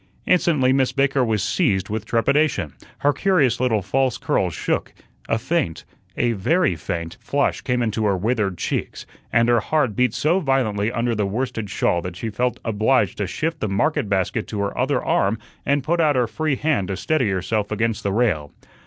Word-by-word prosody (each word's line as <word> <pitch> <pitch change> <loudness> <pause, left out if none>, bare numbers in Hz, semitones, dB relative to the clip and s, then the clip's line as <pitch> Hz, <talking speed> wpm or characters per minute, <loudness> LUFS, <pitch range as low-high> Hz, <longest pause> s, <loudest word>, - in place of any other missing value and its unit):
Instantly 150 -8 +3
Miss 130 -2 +2
Baker 135 0 +2
was 110 -4 0
seized 100 - +1
with 110 0 -3
trepidation, 115 - +1 0.3
her 145 +1 +3
curious 145 - +2
little 115 -5 +1
false 130 +5 0
curls - - 0
shook, - - -2 0.3
a 115 - +2
faint 140 - -2 0.3
a 120 - +2
very 130 - +1
faint 85 +2 -5
flush 140 0 0
came 125 -2 0
into 110 -1 -1
her 100 -2 +2
withered 105 -2 0
cheeks, - - -3 0.3
and 115 0 +3
her 120 -1 +4
heart 145 -8 0
beat 125 -1 +1
so 155 +8 +2
violently 120 - 0
under 120 -1 0
the 105 -2 0
worsted 115 0 -3
shawl 85 - +1
that 90 0 -6
she 110 +4 -4
felt 125 +4 -1
obliged 110 -1 +1
to 100 - -1
shift 165 - -3
the 110 - -2
market 145 +4 0
basket 100 +3 0
to 105 - -4
her 100 0 -2
other 135 +3 0
arm 100 +3 +2 0.3
and 140 0 +2
put 170 +4 0
out 150 -3 +3
her 125 -1 +3
free 150 +5 -1
hand 145 -11 0
to 95 - -3
steady 155 -8 +1
herself 100 +3 -1
against 110 0 0
the 100 - -1
rail. 95 -10 0
115 Hz, 190 wpm, -22 LUFS, 100-135 Hz, 0.3 s, her